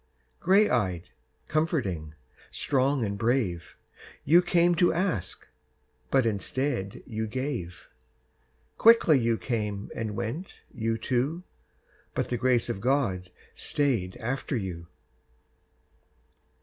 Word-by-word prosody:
Grey 200 +4 +5
eyed, 95 -7 -1 0.4
comforting, 100 - -1 0.3
strong 135 -2 +1
and 100 -1 -3
brave, 110 - 0 0.5
You 170 +5 +6
came 175 -1 +3
to 175 +1 +4
ask 165 - -2 0.6
but 130 - +3
instead 115 0 -2
you 110 -2 -4 1.5
Quickly 225 - +6
you 115 -1 +1
came 105 -5 -3
and 110 -2 -3
went, 120 - -5
you 115 0 -1
two, 135 +9 -1 0.7
But - - -1
the 120 - -1
Grace 125 -1 +2
of 115 -5 -3
God 115 -9 0 0.2
stayed 130 -12 0
after 130 +3 -3
you. 90 -6 -4
120 Hz, 100 wpm, -28 LUFS, 100-145 Hz, 1.5 s, You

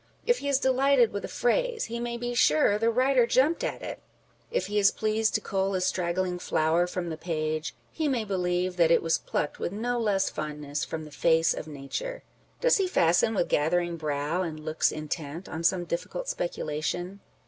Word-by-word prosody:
If 485 0 +3
he - - -4
is 280 -1 +3
delighted 260 -2 +3
with 200 - -3
a - - -5
phrase, 470 - 0
he 235 +1 -5
may 235 0 -3
be 240 0 -3
sure 205 -1 +4
the 225 +1 +3
writer 255 +1 +3
jumped 300 - +2
at - - -3
it; - - -6 0.5
if 185 - -1
he 205 +2 0
is 200 -1 +6
pleased 220 0 0
to 215 - +1
cull 195 -1 -1
a 185 - 0
straggling 180 0 -1
flower 165 +1 +1
from 180 -1 -4
the 160 - -5
page, 155 -2 -3 0.2
he 315 -2 -1
may 255 -5 0
believe 180 -2 -1
that 170 -2 +4
it 165 - +4
was 165 0 +2
plucked 150 - -3
with - - -2
no 240 +4 -2
less 200 -4 +1
fondness 150 -1 -4
from 160 -1 -5
the 150 - -12
face 165 +1 +3
of - - -6
nature. 155 - -5 0.4
Does - - +4
he 390 -2 +1
fasten, 175 - +3
with 175 - +1
gathering 175 +3 +1
brow 155 +2 -1
and 160 -4 -4
looks 155 0 +1
intent, 155 +2 -5
on 160 +1 -5
some 175 +1 +2
difficult 175 - -4
speculation? 175 - -3
180 Hz, 195 wpm, -27 LUFS, 160-235 Hz, 0.5 s, is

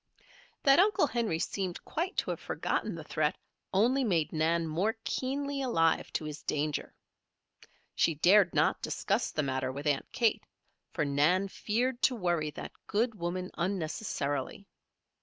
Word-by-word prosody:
That 275 +1 +6
Uncle 400 -2 +4
Henry 235 - -1
seemed 185 +1 -3
quite 355 +5 -3
to - - 0
have - - -4
forgotten - - -2
the - - -7
threat - - 0 0.3
only 245 +8 +3
made 170 -9 +1
Nan 165 +1 +1
more 185 +8 0
keenly 280 +1 -2
alive 165 -11 +2
to 155 - -2
his 150 0 -6
danger. 150 0 -2 1.0
She 165 - +2
dared 185 +4 +5
not - - +2
discuss - - -1
the 155 - -1
matter 130 -1 -1
with 140 +3 -7
Aunt 145 -2 0
Kate, 230 -2 +1 0.5
for 150 - -1
Nan 155 +8 +2
feared 240 +6 -1
to 255 - +3
worry 175 -7 0
that - - -7 0.2
good 230 +3 +1
woman 180 -1 -4
unnecessarily. 160 -3 -2
180 Hz, 145 wpm, -30 LUFS, 155-235 Hz, 1.0 s, That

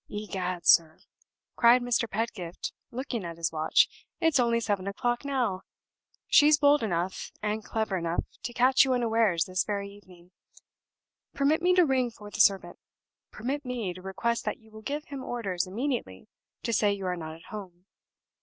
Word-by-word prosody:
Egad, 185 -4 -4
sir!" 160 -1 +5 0.6
cried 240 +1 +5
Mr. 240 -1 0
Pedgift, 200 -6 -4 0.2
looking 240 -3 -4
at 170 -1 -6
his 165 -1 -1
watch, 155 -1 +3 0.3
"it's 325 -4 +3
only 235 -1 +3
seven 205 -4 -2
o'clock 240 +5 -1
now. 250 -9 -1 0.6
She's 300 +1 +6
bold 290 0 +4
enough 185 -3 -2
and 215 +1 -1
clever 220 -4 -2
enough 170 -1 -1 0.2
to 240 - -4
catch 250 +2 +5
you 265 -1 +1
unawares 225 -8 +2
this 185 0 0
very 200 -1 -3
evening. 185 -3 -17 1.0
Permit 290 +4 +2
me 360 +1 +3
to 360 -2 +6
ring 260 -3 +1
for 210 -2 -12
the - - -7
servant 195 -2 +3 0.5
permit 270 +6 -4
me 240 -8 -3
to 185 - -11
request 230 +5 -2
that - - -2
you 220 -1 -22
will 220 0 -11
give 290 +6 -4
him 275 -2 -7
orders 195 -8 -2
immediately 230 - -3 0.4
to 230 - -1
say 210 -1 +3
you 200 -1 -4
are 180 -1 -1
not 160 -2 -7
at 165 - -16
home. 185 -4 -9
215 Hz, 170 wpm, -28 LUFS, 185-250 Hz, 1.0 s, She's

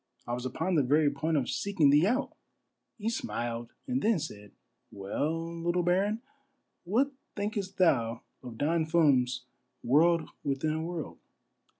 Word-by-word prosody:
" - - -37
I 120 - -2
was 125 +1 -2
upon 165 +8 -2
the 155 - +4
very 145 +3 +3
point 155 +3 0
of 130 -4 0
seeking 190 - +2
thee 150 +6 +5
out." 255 +6 0 0.6
He 215 -1 -4
smiled 120 - -3
and 260 0 -1
then 225 -2 +3
said, 105 -10 -7 0.2
— - - -49
"Well, 165 +12 -3
little 175 +1 +1
baron, 200 +6 +1 0.6
what 245 +10 +2 0.2
thinkest 205 -2 -3
thou 120 -10 +2 0.2
of 120 -3 -9
Don 160 +3 +1
Fum's 130 -6 +3 0.4
World 160 +5 +3
within 145 +2 0
a 160 - -2
World? 165 -2 -5
160 Hz, 155 wpm, -30 LUFS, 130-185 Hz, 0.6 s, thee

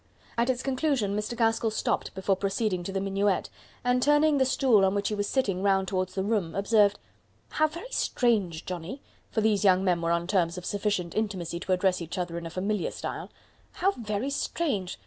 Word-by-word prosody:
At 235 +2 +1
its 255 -1 0
conclusion 260 -7 0
Mr. 210 +3 -3
Gaskell 225 -1 +2
stopped 215 - -2
before 190 +1 +1
proceeding 195 0 -1
to 195 - -3
the 195 - -1
minuet, 195 0 0 0.3
and 250 +1 +2
turning 295 +1 +4
the 265 - +4
stool 255 -5 +3
on 190 +1 +2
which 200 0 0
he - - -2
was 205 -1 -1
sitting 200 -9 0
round 195 -1 +2
towards 185 -1 -2
the 190 - 0
room, 200 -6 -1
observed, 205 0 +3 0.5
"How 310 - +2
very 340 +11 -9
strange, 205 - 0
Johnnie," 180 - -6 0.3
for 220 - 0
these 215 -1 +2
young 190 -1 +5
men 180 -3 +1
were 165 - 0
on 170 0 +1
terms 175 -2 +1
of 180 - -7
sufficient 200 -4 -1
intimacy 190 -6 -2
to 185 - -4
address 185 0 +2
each 170 +3 -6
other 175 -2 -2
in 170 - -7
a - - -6
familiar 195 +3 -1
style, - - -6 0.4
"How 390 +2 +2
very 230 - -3
strange! 275 - -2
200 Hz, 200 wpm, -27 LUFS, 185-235 Hz, 0.5 s, young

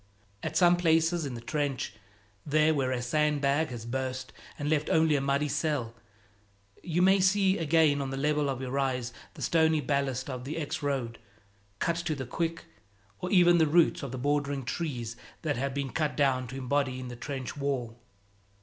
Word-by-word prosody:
At - - -2
some 175 -1 +5
places 165 -1 +2
in 130 - -5
the 115 - -7
trench 145 -1 -2 0.5
there, 155 +1 +3
where 135 -3 0
a 125 -1 -1
sandbag 150 +2 +1
has 120 -4 -7
burst 130 +1 -4 0.2
and 145 - -3
left 150 0 +1
only 160 -1 +4
a 140 - +1
muddy 140 +2 +1
cell 140 -6 -1 0.9
you 175 +1 0
may 190 +1 +5
see 190 0 +3
again 155 -3 +3
on 135 - -3
the 135 - -4
level 150 0 +1
of 135 -1 -3
your 130 +1 -2
eyes 125 -3 -1 0.2
the - - -6
stony 160 -1 +3
ballast 140 -2 -1
of 130 -2 -5
the 150 +5 -5
ex 155 0 -3
road, 130 -5 -2 0.6
cut 170 +10 0
to 170 -2 -2
the 130 -2 -5
quick, 165 +6 -3 0.5
or 180 - -3
even 175 -3 +6
the 160 - +4
roots 165 +2 +3
of 140 -4 -5
the 130 - -5
bordering 140 0 -1
trees 125 -6 -3 0.3
that 145 -5 0
have 135 +1 -2
been 140 -2 -2
cut 155 -2 -1
down 130 -3 +2
to 130 - -8
embody 130 0 0
in 125 -1 -6
the 120 - -7
trench 130 0 -5
wall. 130 -5 -3
145 Hz, 185 wpm, -29 LUFS, 130-160 Hz, 0.9 s, even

